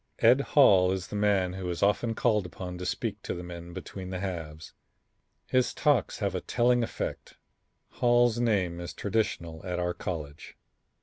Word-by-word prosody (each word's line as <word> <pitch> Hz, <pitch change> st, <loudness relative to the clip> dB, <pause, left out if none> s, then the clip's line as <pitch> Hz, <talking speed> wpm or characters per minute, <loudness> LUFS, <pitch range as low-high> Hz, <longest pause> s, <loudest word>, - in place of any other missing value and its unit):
Ed -, -, +5 dB
Hall 90 Hz, -1 st, +5 dB
is 95 Hz, -1 st, -3 dB
the -, -, -6 dB
man 100 Hz, -3 st, +2 dB
who 95 Hz, -1 st, -4 dB
is 85 Hz, +1 st, -2 dB
often 115 Hz, +3 st, +2 dB
called 105 Hz, -6 st, +1 dB
upon 90 Hz, +1 st, -7 dB
to 90 Hz, -, -4 dB
speak 110 Hz, -2 st, -3 dB
to -, -, -4 dB
the 90 Hz, -, -6 dB
men 85 Hz, 0 st, -8 dB
between 90 Hz, +2 st, -7 dB
the 95 Hz, -1 st, -4 dB
halves. 80 Hz, -5 st, -6 dB, 0.7 s
His 130 Hz, -1 st, +1 dB
talks 145 Hz, -4 st, +2 dB
have 100 Hz, -3 st, -1 dB
a 90 Hz, -, -2 dB
telling 120 Hz, 0 st, +2 dB
effect. 115 Hz, -, -5 dB, 0.5 s
Hall's 120 Hz, -1 st, +3 dB
name 95 Hz, -8 st, +1 dB
is 85 Hz, -, -7 dB
traditional 85 Hz, -7 st, -2 dB
at 90 Hz, -2 st, -3 dB
our 90 Hz, 0 st, -1 dB
college." 80 Hz, -5 st, -6 dB
95 Hz, 170 wpm, -28 LUFS, 90-110 Hz, 0.7 s, Ed